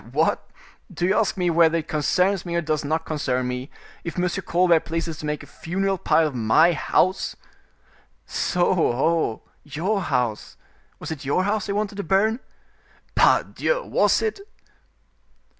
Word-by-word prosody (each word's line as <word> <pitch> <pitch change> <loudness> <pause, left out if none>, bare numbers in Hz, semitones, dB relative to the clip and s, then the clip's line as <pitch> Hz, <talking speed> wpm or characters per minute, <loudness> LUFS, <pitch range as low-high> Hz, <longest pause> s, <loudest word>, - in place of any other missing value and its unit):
"What! - - 0 0.4
do 175 - -2
you 190 +3 +2
ask 215 -2 +1
me 180 -2 +1
whether 165 0 +4
it 160 -1 -4
concerns 180 +4 +1
me 170 -1 -4
or 170 - +1
does 155 -2 -1
not 155 +3 -1
concern 130 -5 -1
me, 125 +2 -4 0.3
if 170 0 -6
M. 180 0 +1 0.2
Colbert 175 -1 +4
pleases 165 0 -4
to 150 - -5
make 150 0 -3
a - - -11
funeral 195 +2 -2
pile 165 - +3
of 150 - -2
my 125 +9 +4
house?" 185 +4 0 0.9
"So, 175 0 0
ho, 160 -4 +1 0.2
your 175 +8 -2
house—was 120 - -5
it 155 -2 -6
your 145 +7 +1
house 205 +1 -1
they 200 - -1
wanted 205 0 -2
to 200 - -3
burn?" 210 +7 +2 0.7
"Pardieu! - - +2
was - - +2
it!" 435 -2 -2
170 Hz, 155 wpm, -23 LUFS, 150-190 Hz, 0.9 s, whether